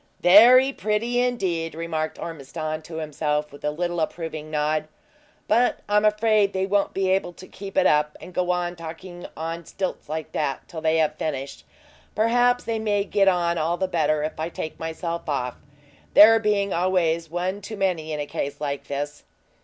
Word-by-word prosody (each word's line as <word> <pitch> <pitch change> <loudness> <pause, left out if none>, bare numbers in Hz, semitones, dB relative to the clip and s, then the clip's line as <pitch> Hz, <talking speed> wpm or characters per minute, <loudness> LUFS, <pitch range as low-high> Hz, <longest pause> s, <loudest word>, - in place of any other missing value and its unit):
"Very 245 +8 +7
pretty 230 +3 0
indeed!" 185 -10 -1
remarked 160 -1 -3
Ormiston 155 0 -5
to 160 +1 -10
himself, 150 -1 -2
with 145 - -14
a 150 - +1
little 175 +3 -2
approving 155 -1 -4
nod; 155 0 0 0.6
"but 235 +3 +2
I'm 210 +1 +3
afraid 215 -1 +3
they 190 0 0
won't 200 +1 0
be 190 -1 +1
able 190 -2 0
to 185 - -13
keep 195 -1 -9
it - - +4
up, 150 0 +2
and 180 - -11
go 180 0 -1
on 175 0 0
talking 175 +2 -9
on 165 +1 -4
stilts 185 -1 -5
like 155 0 -4
that, 140 -3 -2
till 160 -2 -7
they 160 0 +2
have 155 -2 +1
finished. 135 - -4 0.5
Perhaps 245 +3 +3
they 225 -1 -2
may 205 -2 +1
get 200 0 +2
on 170 -2 +2
all 165 +3 0
the 190 - 0
better 155 -4 +1
if 155 0 -4
I 160 +2 -2
take 160 -2 -6
myself 165 +1 -4
off, 125 -4 -1 0.6
there 225 +2 +9
being 205 -2 +1
always 170 -2 +1
one 180 +4 -2
too 215 +2 -7
many 175 -5 -1
in 150 - -3
a 145 - -2
case 140 0 -4
like 140 -2 -3
this." 145 +1 -4
170 Hz, 180 wpm, -24 LUFS, 155-200 Hz, 0.6 s, there